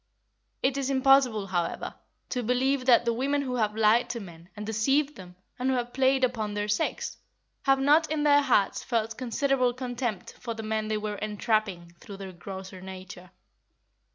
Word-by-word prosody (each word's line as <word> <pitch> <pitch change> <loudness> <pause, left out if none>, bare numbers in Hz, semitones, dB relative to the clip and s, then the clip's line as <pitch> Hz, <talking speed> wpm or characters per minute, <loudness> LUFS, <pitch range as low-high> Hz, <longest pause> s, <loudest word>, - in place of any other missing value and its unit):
It 265 +1 +2
is 275 -1 -1
impossible, 265 -5 +4
however, 175 -3 -2 0.4
to 250 - -1
believe 255 +3 +1
that 240 -2 +6
the 235 - +2
women 280 +4 0
who 250 -2 -2
have 215 -2 0
lied 220 +2 +3
to 235 - -3
men, 170 -3 -12
and 210 - -5
deceived 270 +7 +1
them, 180 -2 -12 0.2
and 255 +1 0
who 260 - +2
have 245 0 -3
played 265 0 +3
upon 220 -5 0
their 205 0 -1
sex, 210 0 -1 0.5
have 270 -1 +4
not 300 +4 +4
in 305 -1 0
their 290 -1 +6
hearts 205 -8 +2
felt 225 -2 -1
considerable 255 +1 +1
contempt 245 -5 -4
for 230 -2 -5
the 220 - -6
men 215 0 -1
they 215 0 0
were 210 -1 -4
entrapping 210 -5 -1
through 200 - -10
their 195 -1 -7
grosser 190 +1 -9
nature. 185 -1 -10
230 Hz, 180 wpm, -27 LUFS, 205-265 Hz, 0.5 s, that